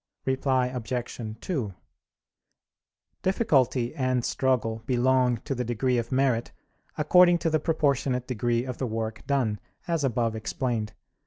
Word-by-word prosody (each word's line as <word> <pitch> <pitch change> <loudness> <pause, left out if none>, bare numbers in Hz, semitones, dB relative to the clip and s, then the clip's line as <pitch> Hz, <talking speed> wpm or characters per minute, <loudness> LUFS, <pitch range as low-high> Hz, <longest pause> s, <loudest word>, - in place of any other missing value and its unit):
Reply 130 -1 +1
Obj. 120 -2 -4
2: 130 - -2 1.5
Difficulty 130 - +2
and 130 -2 0
struggle 115 -4 0
belong 125 -1 +3
to - - -1
the 125 -1 -2
degree 120 +1 0
of 115 0 -5
merit 130 -3 +1 0.5
according 175 +3 +6
to 165 -1 -1
the 155 - +3
proportionate 140 -5 +1
degree 120 -1 0
of 125 -2 -5
the 130 - -1
work 110 0 -3
done, 120 -7 +1 0.3
as 165 -3 0
above 115 -3 0
explained. 110 -1 -2
125 Hz, 130 wpm, -27 LUFS, 115-135 Hz, 1.5 s, according